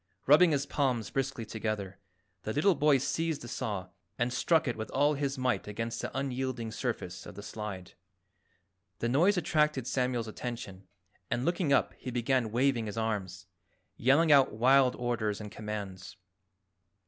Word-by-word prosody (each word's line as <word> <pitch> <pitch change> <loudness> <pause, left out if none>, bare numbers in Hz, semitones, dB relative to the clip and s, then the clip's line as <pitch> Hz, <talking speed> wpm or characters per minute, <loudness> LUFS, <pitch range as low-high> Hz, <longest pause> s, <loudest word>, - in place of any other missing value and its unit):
Rubbing 155 +6 +7
his 140 -2 +1
palms 125 -7 -1
briskly 135 -3 -2
together, 105 -3 -4 0.4
the 110 - -4
little 185 +7 +4
boy 150 -3 +4
seized 160 +3 -2
the - - -7
saw 100 -5 -4 0.3
and 120 +1 0
struck 160 +3 +2
it 120 - -1
with 110 0 -5
all 145 +1 +2
his 140 -1 -2
might 130 -4 0
against 115 +2 -4
the - - -3
unyielding 130 -4 -2
surface 100 -7 -4
of - - -10
the 100 - -8
slide. 100 -5 -7 1.0
The 115 - -1
noise 170 +11 +3
attracted 150 -5 +1
Samuel's 125 -3 -1
attention, 110 -5 -7 0.4
and 120 +2 -1
looking 175 -3 0
up 140 - +3
he 130 - -6
began 120 -1 0
waving 120 -1 +1
his 105 - -6
arms, 95 -5 -3 0.5
yelling 145 +7 +4
out 140 -2 +6
wild 130 +3 +4
orders 115 -4 -1
and 105 -1 -7
commands. 105 -3 -6
120 Hz, 155 wpm, -30 LUFS, 110-140 Hz, 1.0 s, Rubbing